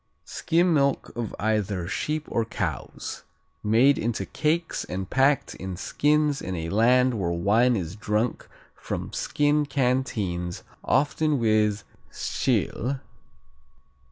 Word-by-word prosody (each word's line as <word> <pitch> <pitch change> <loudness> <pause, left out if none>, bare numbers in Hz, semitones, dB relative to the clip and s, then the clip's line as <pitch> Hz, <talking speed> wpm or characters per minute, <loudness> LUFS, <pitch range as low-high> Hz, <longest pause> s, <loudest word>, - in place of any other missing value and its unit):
Skim 170 +1 +1
milk 140 -2 +1
of 120 -3 -4
either 105 -4 0
sheep 150 - -2
or 115 - 0
cows. 110 - -4 0.4
Made 120 +7 +4
into 115 0 -1
cakes 160 +2 -1
and 95 0 -5
packed 135 +4 +2
in 95 -1 -6
skins 150 +6 +1
in 95 - -4
a 80 -1 -4
land 125 +3 +3
where 85 -3 0
wine 105 +9 +3
is 90 -3 -3
drunk 110 +2 -1 0.3
from - - -5
skin 150 0 +1
canteens, 110 -11 -1 0.2
often 150 +2 +2
with 110 -3 +2 0.3
Tschil. 130 +3 -1
120 Hz, 115 wpm, -25 LUFS, 100-140 Hz, 0.4 s, Made